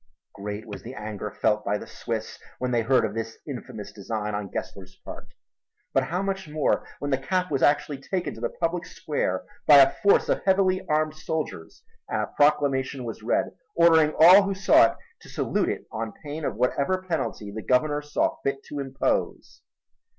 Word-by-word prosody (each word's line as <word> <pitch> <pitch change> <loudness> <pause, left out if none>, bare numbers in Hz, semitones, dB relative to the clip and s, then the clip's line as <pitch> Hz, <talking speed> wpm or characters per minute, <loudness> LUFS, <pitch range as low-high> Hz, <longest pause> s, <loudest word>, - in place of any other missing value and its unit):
Great 105 +1 -6
was 105 -3 -8
the 125 +3 -9
anger 105 -1 -5
felt 105 0 0
by 105 +1 0
the - - -9
Swiss - - -5 0.2
when 125 0 -2
they 120 -1 +2
heard 125 +3 +3
of - - -4
this 115 0 -5
infamous 120 -6 -7
design 105 +1 -4
on 100 -1 -3
Gessler's 95 0 -7
part - - -9 0.7
but 135 -1 +2
how 175 +8 -2
much 195 -4 -3
more 150 -1 0
when 145 - -4
the 135 - +2
cap 180 +5 -1
was 135 - 0
actually 145 -1 +2
taken 180 +6 -3
to - - -11
the - - 0
public 170 +1 -2
square 95 -11 -2 0.2
by 150 - +9
a 135 -1 +7
force 200 - +4
of - - 0
heavily 190 -1 +2
armed 155 0 +1
soldiers 155 - -5 0.3
and - - -1
a - - -2
proclamation 140 -3 +2
was 115 -2 -6
read - - 0 0.2
ordering 160 -2 +5
all 180 +5 +9
who 195 0 -2
saw 190 -10 +6
it - - -7 0.2
to - - -15
salute - - 0
it - - -4
on 110 0 -4
pain 150 +1 -5
of - - -2
whatever 140 - 0
penalty 135 - -3
the 110 +2 -6
Governor 145 +5 +1
saw 150 0 -1
fit 140 0 -2
to 145 - -7
impose! 135 -1 -2
140 Hz, 185 wpm, -25 LUFS, 110-160 Hz, 0.7 s, by